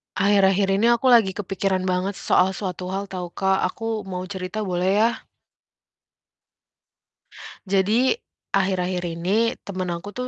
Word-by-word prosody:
Akhir-akhir 195 0 +3
ini 230 - +3
aku 250 +3 -1
lagi 215 -6 +5
kepikiran 195 -1 -1
banget 185 +1 -1
soal 190 +1 +2
suatu 185 -2 -5
hal 200 0 -5
tahu, 180 -2 -4
Kak. 190 0 +1
Aku 220 +1 -4
mau 180 -1 -4
cerita 190 +2 -5
boleh 180 -1 0
ya? 230 - +4 2.6
Jadi 205 +6 +2 0.4
akhir-akhir 185 -2 0
ini 205 +7 +1
temen 185 -2 -4
aku 170 +3 -5
tuh 250 0 -4
190 Hz, 130 wpm, -23 LUFS, 185-205 Hz, 2.6 s, lagi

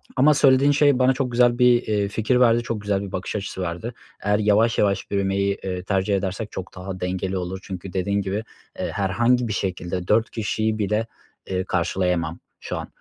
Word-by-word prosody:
ama 145 +4 +5
söylediğin 140 0 +5
şey 145 -2 +4
bana 130 +1 +4
çok 130 -2 -2
güzel 120 0 +3
bir, 125 -1 +5
iii, 105 -2 +1
fikir 110 +4 +1
verdi. 120 -1 +4
Çok 115 -3 -3
güzel 100 -1 0
bir 100 -2 -6
bakış 95 +3 -4
açısı 95 -2 -4
verdi. 90 +7 -4 0.3
Eğer 105 +1 +2
yavaş, 110 +2 +3
yavaş 100 -1 0
büyümeyi, 100 0 0
eee, 90 -1 -3
tercih 95 +1 0
edersek 95 +2 -3
çok 95 -1 -7
daha 95 0 -6
dengeli 95 +1 -2
olur 90 +1 -4
çünkü 95 -1 -7
dediğin 100 +2 0
gibi, 100 +3 -3 0.4
eee, - - -2
herhangi 120 +5 +1
bir 105 - -2
şekilde 90 -2 -3
4 110 +1 +3
kişiyi 110 0 -1
bile, 105 +3 0 0.4
eee, 95 0 -1
karşılayamam 90 -2 -1 0.2
şu - - -5
an. - - -5
100 Hz, 190 wpm, -23 LUFS, 95-115 Hz, 0.4 s, ama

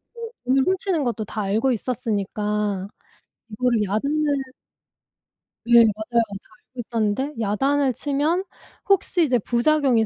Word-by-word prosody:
네. 470 - -10 0.2
돈을 265 +2 +3
훔치는 370 -4 0
것도 230 -4 -2
다 215 +2 -4
알고 215 +6 +1
있었으니까. 210 -4 -2 0.6
이거를 230 0 +1
야단을 285 +9 0 1.3
네 235 0 +7
맞아요. 220 +2 +1 0.2
다 - - -29
알고 - - -42
있었는데 230 +4 -1
야단을 270 +6 +1
치면 295 - 0 0.5
혹시 370 -2 +3
이제 260 -5 +2
부작용이 245 0 +2
240 Hz, 275 characters per minute, -23 LUFS, 215-285 Hz, 1.3 s, 네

